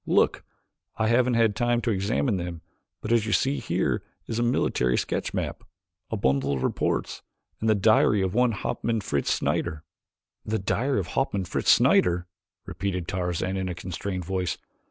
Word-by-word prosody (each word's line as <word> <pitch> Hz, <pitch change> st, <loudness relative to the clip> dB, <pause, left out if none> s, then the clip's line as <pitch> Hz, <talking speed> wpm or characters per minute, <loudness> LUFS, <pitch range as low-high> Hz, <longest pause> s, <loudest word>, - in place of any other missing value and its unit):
Look! -, -, +2 dB, 0.5 s
I 110 Hz, 0 st, +1 dB
haven't 120 Hz, +1 st, +3 dB
yet 115 Hz, -, +3 dB
had 110 Hz, -3 st, +3 dB
time 120 Hz, +1 st, +1 dB
to 120 Hz, -, 0 dB
examine 105 Hz, +3 st, 0 dB
them 85 Hz, -2 st, -5 dB, 0.4 s
but 105 Hz, -, -4 dB
as 115 Hz, -2 st, +3 dB
you 110 Hz, -, 0 dB
see 135 Hz, +2 st, +2 dB
here -, -, 0 dB, 0.2 s
is 115 Hz, 0 st, -3 dB
a -, -, +1 dB
military 65 Hz, -, +1 dB
sketch -, -, -2 dB
map, -, -, -3 dB, 0.5 s
a 110 Hz, -, -2 dB
bundle 70 Hz, -5 st, +1 dB
of 65 Hz, -, -3 dB
reports, -, -, -1 dB, 0.4 s
and 110 Hz, -, 0 dB
the 110 Hz, -, +5 dB
diary 105 Hz, -1 st, +4 dB
of 95 Hz, -1 st, -1 dB
one 125 Hz, 0 st, +3 dB
Hauptmann 115 Hz, +2 st, -2 dB
Fritz 70 Hz, -8 st, 0 dB
Schneider." 75 Hz, -1 st, -1 dB, 0.6 s
"The 110 Hz, +1 st, -1 dB
diary 120 Hz, +6 st, 0 dB
of 90 Hz, -2 st, -4 dB
Hauptmann 100 Hz, -7 st, -1 dB
Fritz -, -, +4 dB
Schneider!" 90 Hz, 0 st, +3 dB, 0.4 s
repeated 90 Hz, -3 st, -3 dB
Tarzan 90 Hz, +1 st, -2 dB
in 95 Hz, -1 st, -2 dB
a 90 Hz, -, -4 dB
constrained 90 Hz, 0 st, -4 dB
voice. 90 Hz, -2 st, -2 dB
100 Hz, 175 wpm, -26 LUFS, 90-115 Hz, 0.6 s, the